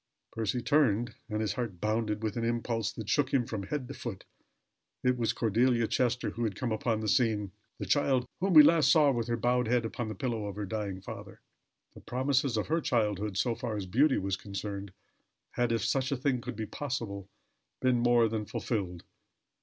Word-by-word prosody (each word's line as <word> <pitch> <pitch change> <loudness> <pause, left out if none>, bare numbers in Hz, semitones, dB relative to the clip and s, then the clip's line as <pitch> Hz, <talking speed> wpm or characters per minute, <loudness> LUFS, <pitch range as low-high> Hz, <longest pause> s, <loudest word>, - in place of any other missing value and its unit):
Percy 115 +2 -2
turned, 120 -4 +2 0.2
and 105 0 -1
his 110 - 0
heart 115 -8 -4
bounded 110 0 -1
with 110 -2 -2
an 115 - -2
impulse 115 -1 -1
that 110 - -7
shook 135 +5 +1
him 130 -3 +2
from 110 -3 -4
head 140 -1 -3
to 140 - -7
foot. 110 -8 -7 0.8
It 125 0 +3
was 115 -2 0
Cordelia 115 +2 +2
Chester 125 +1 0
who 120 - -4
had 105 -4 -1
come 120 +2 -2
upon 110 0 0
the 110 - -3
scene, 105 -3 +2 0.3
the - - -4
child 135 -3 +2
whom 190 +1 +1
we 155 - +12
last 160 0 +5
saw 150 -4 +5
with 120 -3 -1
her 120 0 0
bowed 125 +1 +1
head 120 0 +2
upon 115 +1 -4
the 110 - -5
pillow 115 -6 -2
of 100 - -6
her 105 0 -3
dying 100 -2 -4
father. - - -9 0.5
The - - -13
promises 130 -1 0
of 105 - 0
her 165 +2 0
childhood, 105 - 0
so 120 +4 +1
far 115 -1 -4
as 100 - -3
beauty 130 +10 +3
was 95 0 -1
concerned, 100 0 -6 0.6
had, 120 -1 0
if 115 0 0
such 130 +3 0
a 140 - 0
thing 130 -1 0
could - - -6
be 110 +1 -3
possible, 105 -7 -4 0.5
been 130 -2 +2
more 120 -1 +4
than 110 -1 -3
fulfilled. 90 -7 -3
115 Hz, 200 wpm, -30 LUFS, 105-125 Hz, 0.8 s, we